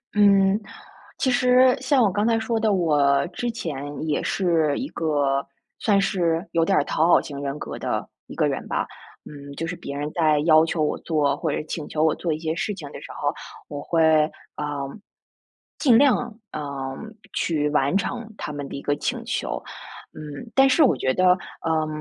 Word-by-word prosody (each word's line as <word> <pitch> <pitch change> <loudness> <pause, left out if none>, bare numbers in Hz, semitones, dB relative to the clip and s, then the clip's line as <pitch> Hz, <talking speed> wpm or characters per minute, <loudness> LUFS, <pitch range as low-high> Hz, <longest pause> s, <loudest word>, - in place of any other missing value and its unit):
嗯， 200 0 +5 0.6
其 260 - +1
实 250 +1 +5
像 265 -1 +3
我 200 - +3
刚 205 +2 0
才 230 -1 +2
说 225 0 -1
的， 215 -2 +2
我 145 -6 +3
之 240 +7 -4
前 145 -7 -5
也 150 - 0
是 165 -6 +1
一 270 - -3
个 145 -4 0 0.3
算 200 -3 +3
是 175 -2 0
有 165 - +2
点 - - +2
儿 145 - +3
讨 160 - +1
好 - - +6
型 140 -1 -7
人 140 +1 -3
格 - - -7
的 - - -2 0.2
一 - - -9
个 - - +2
人 - - -3
吧。 - - -1 0.4
嗯， 140 -1 -10
就 165 - -3
是 170 +2 -4
别 140 - -7
人 150 +1 -3
在 155 -3 +3
要 155 0 +5
求 165 -1 -1
我 - - 0
做， 145 -4 +1
或 - - -1
者 - - -2
请 155 - -5
求 155 - 0
我 160 -1 +4
做 170 - -3
一 155 - -1
些 160 0 -2
事 205 +5 -2
情 150 -6 -9
的 - - -9
时 - - -10
候， - - -1 0.4
我 145 -1 -5
会， 165 +1 +1 0.5
呃， 150 - -3 1.1
尽 245 -6 +5
量， 245 -5 +2
呃， 155 - -4 0.7
去 150 -3 0
完 145 +3 +1
成 225 +1 -4
他 - - -5
们 145 -1 -5
的 - - -7
一 140 - -6
个 145 - 0
请 - - -3
求。 - - -3 0.5
嗯， 155 +9 -9
但 270 +3 +5
是 305 +4 +5
我 260 - +4
觉 130 - 0
得， 185 +3 +3 0.3
呃， 160 -1 0
165 Hz, 210 characters per minute, -24 LUFS, 150-210 Hz, 1.1 s, 好